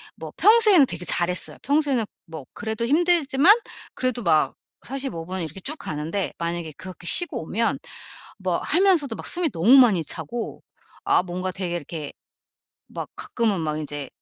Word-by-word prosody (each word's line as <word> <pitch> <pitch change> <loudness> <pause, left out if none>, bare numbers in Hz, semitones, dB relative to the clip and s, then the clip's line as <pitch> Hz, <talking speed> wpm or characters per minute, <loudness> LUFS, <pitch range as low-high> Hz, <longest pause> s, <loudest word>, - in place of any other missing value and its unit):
뭐 - - -9
평소에는 425 -8 +6
되게 175 - -6
잘했어요. 175 +2 0
평소에는 280 -5 +1 0.2
뭐 160 -4 -9
그래도 220 +1 -3
힘들지만 330 - +4 0.4
그래도 255 -2 -2
막 155 -6 +2 0.3
45 260 -11 -4
분 185 0 -3
이렇게 160 +3 -6
쭉 305 +10 -2
가는데 160 - -3
만약에 170 -2 -3
그렇게 185 -2 -10
쉬고 345 - +2
오면 225 +8 -1 0.6
뭐 - - -1
하면서도 345 - +2
막 - - -7
숨이 350 -3 0
너무 190 +11 +5
많이 210 -10 +5
차고 170 +10 -5 0.4
아 - - +3
뭔가 185 +1 -4
되게 180 -2 -3
이렇게 155 -2 -6 0.8
막 - - -6
가끔은 220 -6 -1
막 155 -1 -2
인제 145 -2 -5
195 Hz, 310 characters per minute, -23 LUFS, 165-275 Hz, 0.8 s, 평소에는